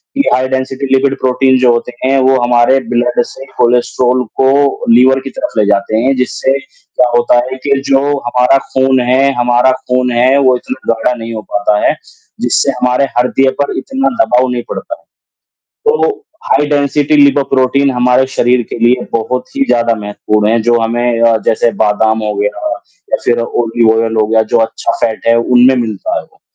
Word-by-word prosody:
कि 280 - +2
high 130 0 +1
density 130 +1 -3
lipid 135 0 +2
protein 130 0 +2
जो 125 -1 +4
होते 120 +1 -3
हैं, 135 +1 +2
वो 130 0 +2
हमारे 120 +2 +3
ब्लड 120 0 +1
से 135 - -11
कोलेस्ट्रॉल 125 +1 +1 0.2
को 140 +1 +1
लीवर 130 +3 +4
की 135 +1 -8
तरफ़ - - -3
ले 105 - +3
जाते 100 +1 0
हैं, 130 +4 +1
जिससे 130 +1 -1
क्या 125 -2 -3
होता 120 0 +2
है 130 +1 -6
कि 140 -1 +1
जो 135 -1 +3 0.2
हमारा 125 +1 +1 0.2
खून 130 0 +2
है 135 +2 +2
हमारा 120 +1 +2
खून 125 -1 -1
है 125 +3 +2
वो 130 -2 +3
इतना 255 - -6 0.2
गाढ़ा 115 +2 -1
नहीं 115 0 -6
हो 110 - -5
पाता 105 0 +1
है, - - +1 0.5
जिससे 140 - +1
हमारे 125 +1 0
हड्डियों 130 +2 +2
पर 140 - -2
इतना 270 0 -2
दबाव 125 0 +1
नहीं 120 -1 -3
पड़ता - - -6
है, - - -30 0.8
तो 450 +1 +2 0.4
हाई 150 - +1
डेंसिटी 145 +1 +1
लिपोप्रोटीन 140 -1 +2
हमारे 125 +1 +2
शरीर 125 +1 +2
के - - -5
लिए 120 +2 +1
बहुत 125 +3 -3
ही - - +2
ज़्यादा 120 -1 +1
महत्वपूर्ण 105 0 -2
हैं, 115 +1 +1
जो 120 +1 +2
हमें 120 +1 -1
अ, 115 -1 +4
जैसे 115 +1 +2
बादाम 110 +1 +1
हो 105 0 -2
गया 105 0 -1 0.6
या - - +2
फ़िर 120 0 +1
ऑलिव 115 -1 0
ऑइल 115 0 -1
हो 110 -1 +2
गया, 110 +1 +2
जो 110 - 0
अच्छा 115 0 -1
फ़ैट 110 -1 -2
है, 115 0 +4
उनमें 125 +2 +3
मिलता 110 -5 -3
है - - -7
वो - - -29
125 Hz, 185 wpm, -12 LUFS, 115-130 Hz, 0.8 s, जो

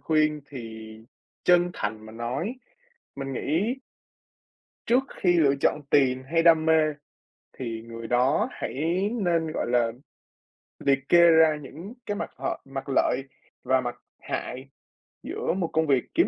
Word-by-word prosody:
khuyên 155 -1 +2
thì 110 -4 -8 0.5
chân 175 0 +4
thành 110 +1 -4
mà 110 - -11
nói 120 - -3 0.6
mình 135 -1 -4
nghĩ 170 - 0 1.1
trước 245 +3 +4 0.2
khi 180 - +4
lựa 140 -4 +4
chọn 150 - +2
tiền 130 -2 +3
hay 165 +5 +1
đam 165 -1 +5
mê 155 -1 +4 0.6
thì 115 -3 -4
người 115 0 -7
đó 125 +4 +2
hãy 170 +8 -1
nên, 165 -5 +1
gọi - - -2
là, 120 -2 +2 0.9
liệt 135 0 +1
kê 175 - +6
ra 160 -1 +5
những 165 - -9
cái 205 -2 -2
mặt - - -4
h - - -12 0.2
mặt 135 0 -6
lợi 135 -1 +2 0.4
và 130 0 +3
mặt 120 -1 -4 0.2
hại 130 +2 -5 0.6
giữa - - -2
một 180 -2 -1
công 160 0 +2
việc 135 -3 +3
kiếm 340 - +4
145 Hz, 150 wpm, -26 LUFS, 125-165 Hz, 1.1 s, kê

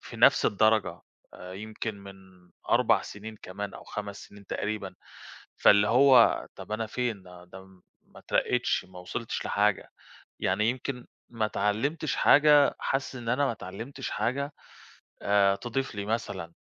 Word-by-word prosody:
في - - -11
نَفس - - +5
الدرجة 110 +1 +2 0.3
آآ، 90 0 -10
يمكن 110 +2 -5
من 100 0 -11 0.6
4 - - +4
سنين 110 +2 -9
كمان 100 +2 -6
أو - - -11
5 100 -1 -6
سنين 100 -1 -16
تقريبًا. 100 -2 -4 0.6
فاللي 105 0 +5
هو 130 0 +5
طَب - - -9
أنا 110 +1 -2
فين 115 -3 -3
ده، 90 +1 -13 0.4
ما - - -18
اتّرقيتش، 125 0 0
ما 90 -1 -12
وصَلتش 100 +6 -5
لحاجة 105 -1 +1 0.5
يعني 105 +5 +1
يمكن 125 0 -4 0.2
ما 115 -2 -1
اتعلّمتش 115 +10 -1
حاجة 145 0 +5
حاسس 135 0 -2
إن 120 -2 -5
أنا 135 +4 +2
ما - - +1
اتعلّمتش 115 +7 -7
حاجة 140 +7 -2 0.7
آآ 100 -1 +3
تضيف 120 +3 -4
لي 100 -1 -4
مثلًا. 105 -6 -4
110 Hz, 140 wpm, -28 LUFS, 100-125 Hz, 0.7 s, نَفس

